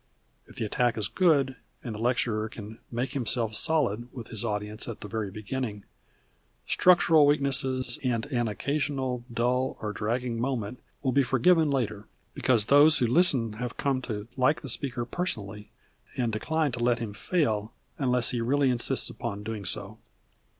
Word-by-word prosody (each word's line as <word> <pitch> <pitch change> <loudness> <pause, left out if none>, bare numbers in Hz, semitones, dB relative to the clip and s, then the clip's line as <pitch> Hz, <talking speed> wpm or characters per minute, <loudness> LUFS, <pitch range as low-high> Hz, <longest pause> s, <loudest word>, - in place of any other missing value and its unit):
If - - -16
the - - -2
attack 120 +2 +1
is 105 - 0
good, 140 -8 +2 0.3
and 120 - -5
the 105 - -7
lecturer 115 -2 0
can 110 0 -10
"make 125 +3 -2
himself 115 -3 0
solid" 120 -4 0
with 120 -4 -9
his 110 -1 -3
audience 105 -1 -3
at 115 - -7
the 105 - -6
very 105 0 -3
beginning, 105 +1 -5 0.8
structural 165 -4 +5
weaknesses 135 -3 +1
and 120 -3 0
an 120 -5 -1
occasional 135 +1 -2
dull 125 +3 0
or 105 -1 -4
dragging 115 +2 -2
moment 125 -3 -2 0.2
will 130 - +1
be 140 - +4
forgiven 150 +6 +3
later, 110 -7 -2 0.3
because 120 -5 +2
those 145 +4 +6
who 125 - +2
listen 125 -4 +2
have 120 +2 -5
come 135 -2 0
to 105 -4 -5
like 135 +3 +2
the 140 - -6
speaker 120 -1 -1
personally, 105 - -4 0.5
and 120 -3 0
decline 155 +6 0
to 120 - -5
let 120 -1 +3
him 115 -3 -5
fail 110 - 0 0.3
unless 125 -3 +3
he 120 -2 -1
really 135 +3 +2
insists 120 -1 +1
upon 100 +1 -5
doing 105 -2 -5
so. - - -4
120 Hz, 165 wpm, -28 LUFS, 110-135 Hz, 0.8 s, those